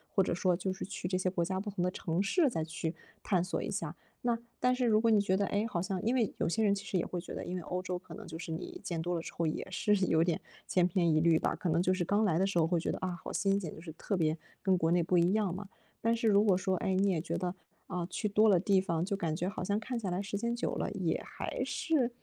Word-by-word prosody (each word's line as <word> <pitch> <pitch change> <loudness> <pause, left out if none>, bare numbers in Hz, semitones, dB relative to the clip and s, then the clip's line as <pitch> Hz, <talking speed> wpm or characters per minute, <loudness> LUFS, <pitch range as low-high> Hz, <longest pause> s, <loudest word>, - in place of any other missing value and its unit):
或 195 - +5
者 - - -1
说 180 +1 +2
就 190 +2 -2
是 185 - -5
去 180 -2 -5
这 185 - +1
些 185 0 +1
国 180 -2 0
家 185 +2 -1
不 205 +2 -4
同 195 -3 -2
的 180 - +1
城 175 0 -1
市 285 - +3
再 165 -10 -2
去， 160 +1 -4 0.3
探 180 -4 +1
索 180 - -2
一 - - -3
下。 165 -5 -3 0.3
那 240 -1 +1 0.2
但 250 0 +3
是 250 0 0
如 215 -2 +4
果 230 0 +4
你 215 - +6
觉 200 -2 +2
得 200 +1 +1
诶， 205 +2 0
好 175 -6 -2
像 190 0 -2
因 240 +3 +2
为 230 -5 +1
有 - - 0
些 220 +7 +1
人 205 -2 +4
其 200 0 -4
实 195 - -1
也 175 - 0
会 180 - -3
觉 175 - -8
得， - - -4
因 180 - -4
为 - - -4
欧 180 +2 -3
洲 185 -1 -3
可 185 - -12
能 - - -9
就 160 -1 -7
是 175 - -7
你 355 - -6
见 170 -2 -3
多 175 +2 -1
了 170 - -1
之 - - -8
后 170 - -1
也 155 - -2
是 190 +3 +1
有 160 -2 +3
点 170 -2 0 0.3
千 180 -1 +4
篇 170 -2 +2
一 155 - +4
律 165 0 +5
吧， - - 0
可 - - -4
能 165 +1 +3
就 185 +1 +3
是 180 -2 -1
刚 205 +5 +2
来 175 -6 +2
的 190 - +3
时 195 - -1
候 165 - +5
会 170 +1 +1
觉 - - -1
得， - - -3
啊， 180 -2 -3
好 - - -6
新 195 0 +2
鲜， 170 -6 -5
就 - - -10
是 165 -1 -8
特 200 +5 -2
别 160 -2 +1 0.2
跟 190 -2 +3
国 160 -2 +1
内 175 0 +4
不 180 +2 +2
一 175 +2 +4
样 210 -5 +1
嘛。 200 +2 -6 0.3
但 230 +1 +2
是 230 0 0
如 205 -1 +5
果 200 -4 +4
说， 185 0 0
诶， 190 +2 0
你 195 +1 +3
也 180 -4 +1
觉 160 - -3
得 180 -1 -2 0.3
啊， 180 -2 -2
去 195 +4 -2
多 210 +2 +5
了 195 -4 +6
地 195 +1 +3
方， 170 -3 0
就 200 +2 -1
感 165 -5 -1
觉 180 +3 -1
好 200 -2 -5
像 200 +3 0
看 240 +2 -3
下 195 -5 -3
来 180 +2 -1
时 200 0 -3
间 235 +3 -1
久 240 - -2
了， - - -1
也 - - -1
还 - - -4
是， 325 - -1
有 - - +5
点 240 -2 +2
185 Hz, 340 characters per minute, -32 LUFS, 175-205 Hz, 0.3 s, 你